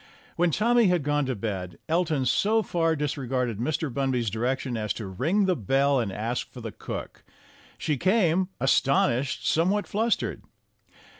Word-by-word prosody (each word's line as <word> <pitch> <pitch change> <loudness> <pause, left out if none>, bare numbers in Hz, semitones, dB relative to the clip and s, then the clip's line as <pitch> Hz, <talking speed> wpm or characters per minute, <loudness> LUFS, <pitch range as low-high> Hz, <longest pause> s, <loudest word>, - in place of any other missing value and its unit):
When 175 0 +2
Tommy 235 - +3
had 180 -4 +2
gone 145 -1 0
to 130 - -1
bed, 95 -5 -4
Elton 160 -5 +1
so 220 - +2
far 165 -3 +1
dis 150 -1 -2
regarded 125 -4 -2
Mr. 150 +1 -1
Bunby's 130 -5 0
direction 125 +3 -1
as 105 -2 -1
to 110 - -6
ring 155 - +1
the 185 -1 +2
bell 135 - +2
and 110 -5 -1
ask 115 +5 -3
for 125 - -10
the 115 -2 -6
cook. - - -7 0.5
She 150 -3 -1
came, 185 - +2
astonished, 135 0 +2
somewhat 190 +6 +2
flustered. 225 +3 -1
140 Hz, 155 wpm, -26 LUFS, 120-175 Hz, 0.5 s, Tommy